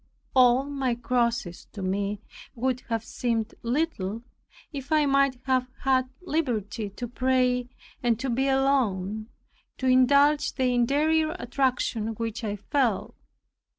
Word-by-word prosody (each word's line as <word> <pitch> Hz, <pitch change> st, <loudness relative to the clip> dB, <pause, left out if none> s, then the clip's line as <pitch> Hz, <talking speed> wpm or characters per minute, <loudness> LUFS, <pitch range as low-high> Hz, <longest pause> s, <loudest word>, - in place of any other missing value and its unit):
All 255 Hz, 0 st, +6 dB
my 275 Hz, -3 st, -1 dB
crosses 235 Hz, -6 st, -1 dB
to 200 Hz, -, -6 dB
me 200 Hz, +2 st, -1 dB, 0.3 s
would 255 Hz, +1 st, 0 dB
have 225 Hz, -1 st, -1 dB
seemed 230 Hz, -3 st, -2 dB
little, 235 Hz, -, -2 dB, 0.5 s
if 275 Hz, 0 st, -7 dB
I 305 Hz, -1 st, +4 dB
might 275 Hz, -2 st, +3 dB
have 255 Hz, -1 st, +1 dB
had 260 Hz, -1 st, +2 dB
liberty 235 Hz, -, -2 dB
to 240 Hz, +5 st, -6 dB
pray 250 Hz, 0 st, +1 dB, 0.3 s
and 235 Hz, -2 st, +1 dB
to 260 Hz, 0 st, -2 dB
be 265 Hz, +3 st, +1 dB
alone, 225 Hz, -7 st, +1 dB, 0.5 s
to 260 Hz, -, -4 dB
indulge 280 Hz, +4 st, +4 dB
the 255 Hz, -2 st, +1 dB
interior 310 Hz, +6 st, +2 dB
attraction 245 Hz, -7 st, -1 dB
which 230 Hz, +1 st, -4 dB
I 205 Hz, -2 st, -2 dB
felt. 235 Hz, +1 st, 0 dB
250 Hz, 125 wpm, -26 LUFS, 225-270 Hz, 0.5 s, All